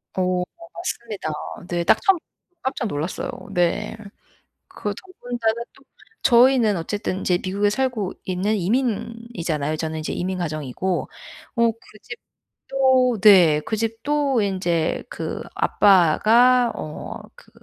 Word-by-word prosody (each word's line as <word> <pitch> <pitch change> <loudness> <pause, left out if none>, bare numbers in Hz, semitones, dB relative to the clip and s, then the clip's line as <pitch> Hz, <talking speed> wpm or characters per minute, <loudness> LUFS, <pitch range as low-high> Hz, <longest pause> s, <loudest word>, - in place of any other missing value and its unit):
어 185 -1 +1 0.3
맞습니다 235 - -4 0.4
네. 175 -1 -1
딱 - - +4
처음 390 -2 +4 0.4
깜짝 260 -2 -2
놀랐어요 155 0 -3 0.2
네. 175 +4 0 0.7
그 205 -3 -4
저 - - -12 0.3
혼자는 235 -1 0
또 275 - -21 0.4
저희는 240 -4 +5
어쨌든 190 +3 -3
인제 180 -2 +1
미국에 200 +2 +1
살고 220 -4 -1
있는 190 +4 0
이민이잖아요. 210 - -2
저는 160 0 -3
이제 155 - -4
이민 185 +1 -2
가정이고 155 +2 -3 0.5
어 235 -1 +3
그 220 -1 -18
집도 260 -3 -1
네 175 -8 +7
그 220 - -1
집도 245 +4 0
인제 180 -5 0
그 - - -5
아빠가 220 +7 +4
어 155 0 -6 0.2
그 - - -19
205 Hz, 235 characters per minute, -22 LUFS, 175-235 Hz, 0.7 s, 네